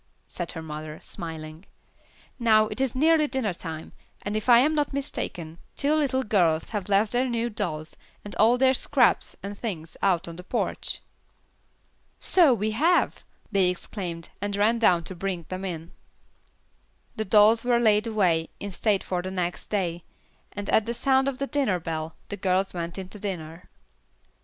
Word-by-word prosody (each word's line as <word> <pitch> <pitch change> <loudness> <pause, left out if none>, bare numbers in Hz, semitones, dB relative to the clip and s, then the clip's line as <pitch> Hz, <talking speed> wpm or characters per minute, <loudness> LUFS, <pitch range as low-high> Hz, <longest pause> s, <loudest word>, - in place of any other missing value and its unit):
said 175 -2 -6
her 160 - -6
mother, 155 0 -7
smiling. 160 0 -7 0.8
"Now 220 -2 +5
it 240 - -4
is 265 -3 0
nearly 310 +2 +4
dinner 260 -8 -1
time, 160 -2 -7 0.3
and 205 +1 -3
if 215 +3 -2
I 240 - +9
am 285 +6 +4
not 295 -2 0
mistaken, 170 - -4 0.2
two 285 +2 +1
little 275 -4 +1
girls 175 -8 +2
have 205 -3 -4
left 205 +2 +3
their 250 +1 +1
new 235 0 -1
dolls, 160 -7 -4 0.3
and 205 - -7
all 230 +4 +5
their 260 +1 +4
scraps 265 -1 +2
and 200 +1 -5
things 175 -8 -5
out 185 -2 +2
on 170 0 -8
the 180 - -8
porch." - - -2 1.2
"So 340 -7 +5
we 215 -2 0
have!" 325 +11 +2 0.3
they 195 -3 +3
exclaimed, 175 -2 -5
and 205 0 -2
ran 220 +3 +3
down 180 -7 +4
to 185 - -5
bring 180 -2 -3
them 185 +1 -5
in. 170 -3 -5 1.2
The 220 - -2
dolls 215 +3 +5
were 245 -1 +3
laid 215 -1 +3
away 180 -7 +1
in 205 - -5
state 200 +2 +1
for 180 -1 -2
the 185 - -5
next 180 -2 -3
day, 175 -5 -2 0.5
and 205 -1 -6
at 220 - +3
the 235 - -2
sound 265 +2 +2
of 275 -2 -1
the 275 - -1
dinner 270 -11 0
bell, 160 -1 -4
the 205 - -4
girls 190 0 +1
went 170 0 -4
into 190 +2 -8
dinner. 175 -4 -6
200 Hz, 170 wpm, -26 LUFS, 175-235 Hz, 1.2 s, I